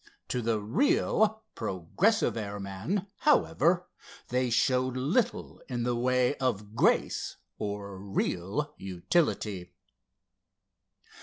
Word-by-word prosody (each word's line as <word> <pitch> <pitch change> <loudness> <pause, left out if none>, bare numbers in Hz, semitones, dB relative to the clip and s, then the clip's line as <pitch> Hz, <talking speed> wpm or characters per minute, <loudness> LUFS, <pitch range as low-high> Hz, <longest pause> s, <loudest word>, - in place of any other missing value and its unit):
To 125 - -1
the 115 -1 +1
real, 220 - +2
progressive 110 - +1
airman, 100 - -3
however, 180 - +3 0.4
they 125 0 +1
showed 130 +1 +2
little 165 - 0
in 120 -2 -2
the 120 0 0
way 125 +2 +2
of 105 -5 -2
grace - - +2 0.2
or 100 -2 -4
real 100 +7 -2
utility. 95 - -1
120 Hz, 90 wpm, -29 LUFS, 100-150 Hz, 0.4 s, however